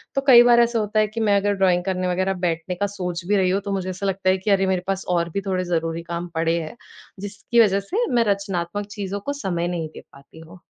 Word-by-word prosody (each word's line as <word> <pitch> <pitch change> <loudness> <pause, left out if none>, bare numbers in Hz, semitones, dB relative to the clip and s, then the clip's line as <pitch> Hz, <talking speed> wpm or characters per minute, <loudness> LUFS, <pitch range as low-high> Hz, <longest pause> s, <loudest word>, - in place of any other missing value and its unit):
तो 275 - +1
कई 240 -2 +9
बार 240 -1 +5
ऐसा 235 -1 +1
होता 215 +1 0
है, 215 - +3
कि 215 +2 -6
मैं 205 -2 +3
अगर 205 +1 +1
ड्राइंग 180 -2 +2
करने 185 -1 -1
वग़ैरह 185 +2 0
बैठने 165 +2 -3
का 205 +3 -1
सोच 180 -2 -4
भी 205 - +2
रही 185 -1 +2
हूँ, 195 +2 0
तो 200 - -5
मुझे 185 -1 -3
ऐसा 185 +2 -5
लगता 190 -1 0
है 190 - +3
कि 195 +3 -2
अरे 195 -1 +3
मेरे 185 -1 0
पास 195 0 -2
और 170 0 -1
भी 200 - -1
थोड़े 185 -1 0
ज़रूरी 165 -1 -2
काम 170 +1 -4
पड़े 165 +1 +1
हैं, 155 - -8 0.4
जिसकी 205 +4 -2
वजह 200 -2 +3
से 470 +5 +1
मैं 235 -1 +4
रचनात्मक 200 0 -4
चीज़ों 200 -1 -4
को 285 - -2
समय 175 -2 -1
नहीं 170 -3 -3
दे - - -10
पाती 140 +3 -16
हूँ। 165 +2 -14
190 Hz, 255 wpm, -22 LUFS, 175-205 Hz, 0.4 s, कई